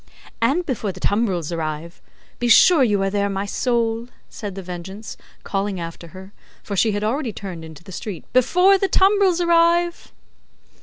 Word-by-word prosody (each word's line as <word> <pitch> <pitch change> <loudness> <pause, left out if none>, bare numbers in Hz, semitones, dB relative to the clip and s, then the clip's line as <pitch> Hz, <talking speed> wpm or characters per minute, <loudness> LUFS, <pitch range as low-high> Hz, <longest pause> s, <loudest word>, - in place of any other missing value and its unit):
"And 285 +10 +2
before 225 -8 -2
the 185 - -12
tumbrils 190 -6 0
arrive. 160 +1 -5 0.4
Be 240 - 0
sure 285 +6 +6
you 205 -5 +2
are 195 - 0
there, 200 0 0
my 195 0 -2
soul," 230 +1 -1 0.2
said 205 -3 -7
The 195 - -7
Vengeance, 185 +4 -8 0.3
calling 195 -1 -2
after 170 0 -7
her, 190 +4 -12 0.3
for 200 - -5
she 215 +2 +2
had 205 +1 -2
already 245 +3 -1
turned 185 -5 -8
into 160 0 -12
the 190 - -12
street, 190 0 -7
"before 360 +10 +4
the 390 - +1
tumbrils 385 -2 +3
arrive!" 340 0 +2
205 Hz, 165 wpm, -21 LUFS, 190-270 Hz, 0.4 s, sure